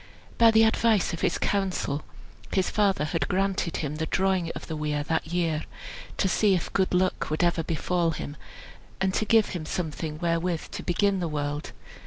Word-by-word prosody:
By 230 -1 +8
the 225 0 +6
advice 220 -4 +3
of 165 - -4
his - - +1
council, 185 -7 -1 0.5
his 190 -2 +1
father 195 -7 +2
had 155 -1 -1
granted 190 -2 0
him 150 -1 -3
the 160 +1 -2
drawing 190 -3 +1
of - - -6
the 160 - -5
weir 150 -1 -1
that 160 +1 -1
year, 165 -2 -1 0.5
to - - +2
see 195 +1 +3
if 175 - -3
good 190 -1 +2
luck 185 +1 +1
would 155 +3 0
ever 170 -1 +2
befall 170 +2 0
him, 150 -2 -5 0.6
and 190 -1 +1
to 215 - 0
give 220 0 +4
him 175 -5 -4
something 155 -2 -3
wherewith 170 0 -1
to - - -5
begin 195 +2 +1
the 175 - -1
world. 145 -1 -3
175 Hz, 185 wpm, -27 LUFS, 155-190 Hz, 0.6 s, By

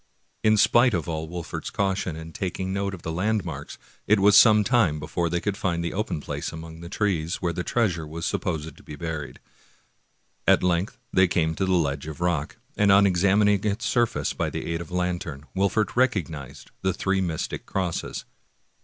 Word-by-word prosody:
In 110 0 +5
spite 120 +2 +5
of 85 -2 -2
all 80 -1 -3
Wolfert's 85 -1 -5
caution 95 -4 -1
in 80 0 -9
taking 95 0 -3
note 100 0 -2
of 85 - -14
the 80 - -3
land 105 +5 0
marks, - - -7 0.3
it 105 0 +4
was 100 +1 +6
some 105 -1 +7
time 100 - +2
before 85 +2 -2
they 85 +1 0
could 100 +2 -2
find 85 -4 -1
the 85 - -3
open 105 -5 -2
place - - -4
among 80 0 -9
the 85 - -8
trees, 90 -5 0
where 85 -1 -2
the 90 - -3
treasure 90 -10 0
was 80 +2 -5
supposed 80 -2 -2
to - - -17
be 75 - -9
buried. 80 -2 -5 1.1
At - - +5
length 90 +2 0 0.2
they 95 0 +5
came 80 -2 +1
to 95 - -1
the 95 - +1
ledge 75 -4 0
of 80 0 -7
rock, 85 -4 -1 0.2
and 100 -1 +4
on 100 +1 +7
examining 100 +2 +3
its 105 +2 -1
surface 120 -1 +1
by - - -1
the - - -5
aid 85 - -2
of 85 - -7
the 90 - -6
lantern, 85 -5 -2
Wolfert 100 +3 +1
recognized 85 - -1
the 95 -1 0
three 95 +1 0
mystic 85 -4 -3
crosses. 90 -3 -3
90 Hz, 195 wpm, -25 LUFS, 80-100 Hz, 1.1 s, some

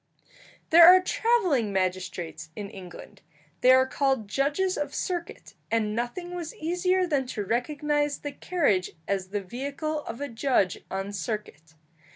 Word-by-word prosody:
There 335 +1 +10
are 365 +1 +10
travelling 365 - +1
magistrates 185 -3 -3
in 205 -2 -6
England; 180 -3 -11 0.4
they 250 - +5
are 260 0 +6
called 265 -4 0
judges 290 - 0
of 295 - -3
circuit, 350 -2 -4 0.2
and 215 -2 0
nothing 245 +10 -4
was 345 -3 -6
easier 360 +3 +1
than 285 -6 0
to 210 -5 -4
recognize 290 +5 0
the 290 - -6
carriage 285 - 0
as 195 -2 -1
the 200 +1 -3
vehicle 280 - -4
of 230 - -6
a 285 - -3
judge 235 -5 +1
on 195 +1 -4
circuit. 165 -5 -5
260 Hz, 145 wpm, -27 LUFS, 200-315 Hz, 0.4 s, There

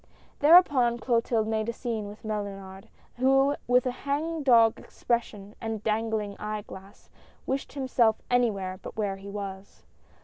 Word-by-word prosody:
Thereupon 290 -7 +5
Clotilde 230 -1 0
made 220 0 -1
a - - -2
scene 225 -4 -4
with 210 +2 -11
Mellunard, 195 -2 -6 0.3
who 270 +2 +3
with 250 +1 +3
a 255 - 0
hang 300 +5 -3
dog 230 -5 +5
expression 210 -4 -3
and 225 -2 -4
dangling 220 -2 -1
eye 210 0 -4
glass, 195 0 -13 0.3
wished 270 +1 -3
himself 255 -5 +2
any 245 -1 +3
where 190 -2 -5
but - - -9
where 200 -3 -1
he 195 +1 -10
was. 200 -1 -8
225 Hz, 145 wpm, -27 LUFS, 205-250 Hz, 0.3 s, Thereupon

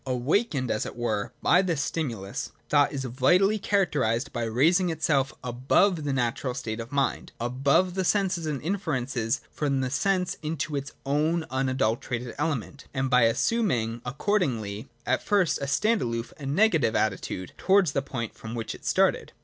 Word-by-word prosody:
Awakened, 130 - 0
as 110 - -1
it - - -8
were, 115 -4 -2
by 180 - +5
this 170 -6 -1
stimulus, 120 -10 -3 0.2
thought 145 -1 +4
is 135 -2 -3
vitally 180 - +3
characterised 145 - 0
by 120 -1 -1
raising 165 +11 +3
itself 145 -4 +1
above 140 - +2
the 145 - 0
natural 125 0 -1
state 110 -3 -4
of 115 +3 -7
mind, 140 -1 -1
above 135 +9 +2
the 190 0 -1
senses 180 -4 +1
and 145 -3 -2
inferences 135 - -1
from 140 -3 0
the 130 -1 -2
senses 180 +6 0
into 155 -1 -3
its 140 0 -4
own 155 +4 +1
unadulterated 125 -2 -1
element, 140 -3 -2
and 130 0 -1
by 125 -2 +6
assuming, 120 - +1
accordingly, 125 - -1 0.2
at 130 +1 +1
first 200 -5 +2
a 140 - -2
stand 215 +12 +2
aloof 115 -1 -3
and 140 -1 -3
negative 170 - +3
attitude 95 -3 -1
towards 190 -5 +3
the 140 - 0
point 120 -5 -5
from 110 +1 -8
which 115 -1 -4
it - - -13
started. - - +1
135 Hz, 160 wpm, -27 LUFS, 120-170 Hz, 0.2 s, by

